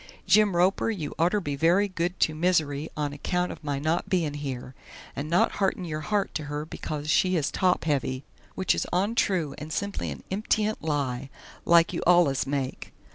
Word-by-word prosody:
Jim 210 -3 +4
Roper 185 +5 +2
you 170 -10 -3
orter 180 +6 +3
be 145 -7 -3
very 175 +7 +3
good 180 -1 -3
to 155 - +3
Mizzery 155 -3 0
on 145 -1 -1
a 145 - -10
kount 180 +3 -1
of - - -10
my 145 -2 -2
not 155 +4 -1
bein' 165 -6 +1
here, 135 -3 -5 0.4
and 145 +2 -4
not 175 +2 +3
harten 190 -1 +1
your 155 -2 -4
hart 205 +3 -1
to 155 - -3
her 145 +1 -4
bekos 150 -1 -5
she 185 +4 +3
is 155 -4 0
top 185 -1 +1
heavy 135 -3 -1 0.3
which 190 - +2
is - - -2
ontroo 185 -5 +1
and 150 +1 -7
simply 200 +5 -2
an - - -7
imptient 215 +2 0
lie 140 -4 -2 0.4
like 170 -1 +5
you - - -2
allus 170 -7 +4
make. 135 -2 -3
165 Hz, 185 wpm, -27 LUFS, 145-185 Hz, 0.4 s, like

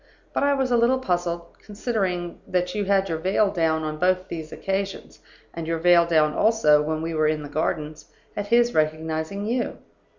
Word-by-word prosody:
But - - 0
I 285 0 +3
was 265 -2 -1
a 240 - +4
little 240 +3 +3
puzzled 175 -6 -3
(considering 195 -5 -3
that 180 0 -1
you 205 -1 -1
had 195 0 +2
your 165 -3 -2
veil 195 +4 +2
down 160 -3 0
on 155 0 -4
both 185 +1 +1
those 160 -2 -6
occasions, 195 0 -4 0.3
and 165 -1 -6
your 165 0 0
veil 170 0 +5
down 155 -2 +3
also 215 -10 +4
when 155 +1 -2
we 165 0 -3
were 155 -1 +2
in 155 -1 -1
the 145 - -8
Gardens) 155 0 -3 0.3
at 205 0 -3
his 240 +2 +3
recognizing 160 +5 -1
you. 240 +2 -2
175 Hz, 190 wpm, -24 LUFS, 160-200 Hz, 0.3 s, veil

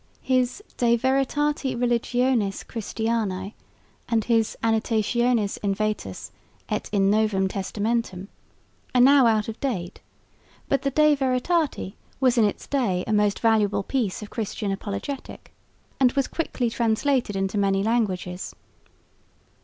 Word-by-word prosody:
His 255 +8 0
De 235 -1 +3
Veritate 270 +2 0
Religionis 240 -3 +1
Christianae 220 -3 -3 0.6
and 230 -2 +2
his 225 -1 +1
Annotationes 225 0 +1
in 200 -1 0
Vetus 210 - -3 0.4
et - - -3
in 195 -1 +3
Novum 210 -3 +2
Testamentum 200 0 -2 0.7
are 250 - +6
now 270 -1 +7
out 215 -2 +2
of 225 0 -6
date; 190 -11 -3 0.7
but 275 - +1
the 275 - 0
De 305 +2 +4
Veritate 270 - 0 0.3
was 260 -2 +3
in 220 - +5
its 205 - -2
day 210 -10 0
a 220 - -1
most 210 -1 +2
valuable 215 -3 +2
piece 220 -4 -2
of 210 - -10
Christian 215 -2 -3
apologetic 200 +7 -6 0.5
and 255 -2 +4
was 275 -2 +1
quickly 250 -7 -2
translated 235 0 +1
into 195 +1 -1
many 195 -1 +2
languages. 190 -5 -1
225 Hz, 125 wpm, -24 LUFS, 200-255 Hz, 0.7 s, now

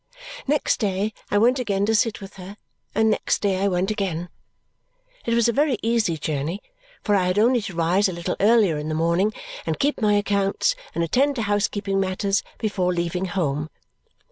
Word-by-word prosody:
Next 295 +1 +1
day 205 0 -1 0.2
I 205 - +2
went 245 +5 +4
again 200 -5 0
to 220 - +1
sit 220 0 +1
with 195 0 -10
her, 195 +2 -9 0.4
and 220 0 +3
next - - 0
day 195 -2 0
I 200 - +2
went 185 +1 0
again. 180 -5 -2 1.0
It 230 - +2
was 235 -1 +3
a - - +3
very 285 -2 +2
easy 225 -7 +1
journey, 155 +4 -2 0.4
for 210 - +1
I 190 -2 +3
had 180 +2 0
only 240 +3 +4
to 195 -3 -7
rise 180 +5 +2
a - - -4
little 170 +1 -3
earlier 205 -7 +4
in 150 +1 -4
the 155 - -1
morning, 170 +6 +2 0.3
and 160 -1 -2
keep 285 -2 0
my 210 -1 +3
accounts, 200 - +1 0.2
and 170 - +1
attend 275 - +2
to 230 - -1
housekeeping 205 -1 0
matters 195 +1 0 0.2
before 190 -5 0
leaving 175 +1 -1
home. 155 -5 -2
200 Hz, 190 wpm, -23 LUFS, 180-220 Hz, 1.0 s, went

